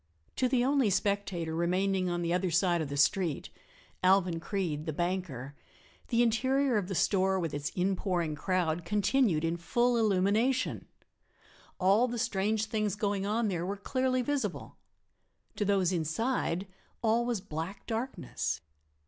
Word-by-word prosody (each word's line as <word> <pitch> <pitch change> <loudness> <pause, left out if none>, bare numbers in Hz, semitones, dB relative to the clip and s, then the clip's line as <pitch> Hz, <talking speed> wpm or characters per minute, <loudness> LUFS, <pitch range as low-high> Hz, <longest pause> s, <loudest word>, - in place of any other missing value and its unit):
To 255 - +2
the 245 -1 +2
only 270 -4 +3
spectator 195 -4 -1
remaining 185 +2 +1
on 175 0 -1
the 170 0 0
other 180 +1 +1
side 175 0 +2
of 150 - -3
the 140 - -4
street 160 +3 +1 0.5
Alvan 185 -2 +3
Creede, 165 -5 -3
the 155 - -1
banker 175 -6 -3 0.5
the 235 -1 +3
interior 260 +3 +2
of 195 -4 -1
the 190 - -3
store 190 +1 +2
with 165 -4 -3
its 145 0 -2
inpouring 180 -3 0
crowd 175 0 -1
continued 205 - +2
in 165 +1 -1
full 240 +8 +1
illumination; 220 +4 +1 0.9
all 200 +6 +4
the 240 0 -4
strange 220 -2 0
things 215 -3 -1
going 205 -1 -1
on 220 +2 +1
there 175 -4 -1
were 195 +3 -3
clearly 255 +4 0
visible. 285 +1 -3 0.8
To 205 - 0
those 190 -3 +2
inside 175 - -1 0.4
all 230 +1 +3
was 240 -3 -1
black 180 +1 -6
darkness. 230 - -3
195 Hz, 145 wpm, -30 LUFS, 175-225 Hz, 0.9 s, all